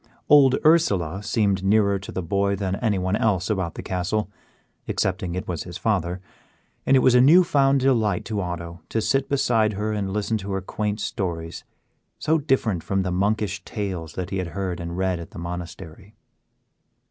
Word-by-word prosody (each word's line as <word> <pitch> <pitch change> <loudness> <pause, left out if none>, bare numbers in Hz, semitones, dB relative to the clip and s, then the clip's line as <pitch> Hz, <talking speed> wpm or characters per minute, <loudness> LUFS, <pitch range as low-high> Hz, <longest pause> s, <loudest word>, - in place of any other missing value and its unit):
Old 140 -3 +7
Ursela 100 - +3
seemed 100 -2 +1
nearer 100 0 +3
to 100 - -9
the 95 - -4
boy 100 +3 0
than 95 -1 -2
anyone 100 -4 0
else 105 -2 +1
about 95 -5 -2
the - - -6
castle, 95 +3 -2 0.6
excepting 90 -2 -1
it 90 - -4
was 85 -4 -3
his 90 -1 -7
father, 90 -5 -1 0.7
and 135 - +6
it - - +4
was 130 - +5
a 125 - +6
newfound 140 -3 +5
delight 115 -8 +1
to 105 -2 -2
Otto 85 -1 -6
to 115 - 0
sit 135 +4 0
beside 115 -6 +2
her 105 +2 -2
and 100 -2 -2
listen 105 +2 -1
to 100 0 -5
her 95 - -1
quaint 105 +2 -3
stories, 85 -5 -4 0.5
so 160 +2 +1
different 130 - 0
from 95 +3 -1
the 90 - -2
monkish 100 +1 0
tales 90 -7 -5
that 90 +1 -5
he 95 - -1
had 90 - -2
heard 95 -3 -2
and 85 0 -5
read 95 -2 0
at 85 - -8
the - - -12
monastery. 85 +2 -8
100 Hz, 180 wpm, -24 LUFS, 90-110 Hz, 0.7 s, Old